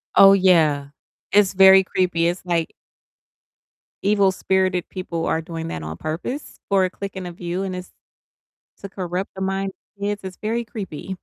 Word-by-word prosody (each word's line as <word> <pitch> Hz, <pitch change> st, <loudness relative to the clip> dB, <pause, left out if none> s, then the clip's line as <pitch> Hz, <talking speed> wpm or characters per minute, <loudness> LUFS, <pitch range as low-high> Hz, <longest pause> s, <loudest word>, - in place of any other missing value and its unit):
Oh, 195 Hz, 0 st, +9 dB
yeah, 160 Hz, -7 st, +3 dB, 0.4 s
it's 200 Hz, -1 st, +4 dB
very 190 Hz, 0 st, +8 dB
creepy, 180 Hz, -3 st, +1 dB
it's 175 Hz, +1 st, -3 dB
like 170 Hz, -2 st, -1 dB, 1.3 s
evil-spirited 190 Hz, -2 st, +1 dB
people 170 Hz, -3 st, -4 dB
are 160 Hz, -, 0 dB
doing 165 Hz, 0 st, -6 dB
that 80 Hz, -, -5 dB
on 80 Hz, +1 st, -5 dB
purpose 170 Hz, -, -5 dB
for 195 Hz, -1 st, +4 dB
a -, -, -1 dB
click 195 Hz, +1 st, -7 dB
and 185 Hz, -1 st, -5 dB
a -, -, -6 dB
view, 175 Hz, +2 st, -4 dB
and 185 Hz, -1 st, -3 dB
it's 180 Hz, 0 st, -8 dB, 0.9 s
to 200 Hz, -, -7 dB
corrupt 185 Hz, 0 st, -4 dB
the 190 Hz, -, -8 dB
minds 195 Hz, 0 st, -1 dB, 0.3 s
of -, -, -14 dB
kids, 205 Hz, 0 st, -1 dB
it's 185 Hz, -1 st, -7 dB
very 230 Hz, +2 st, -1 dB
creepy 190 Hz, -4 st, -7 dB
185 Hz, 165 wpm, -22 LUFS, 170-195 Hz, 1.3 s, Oh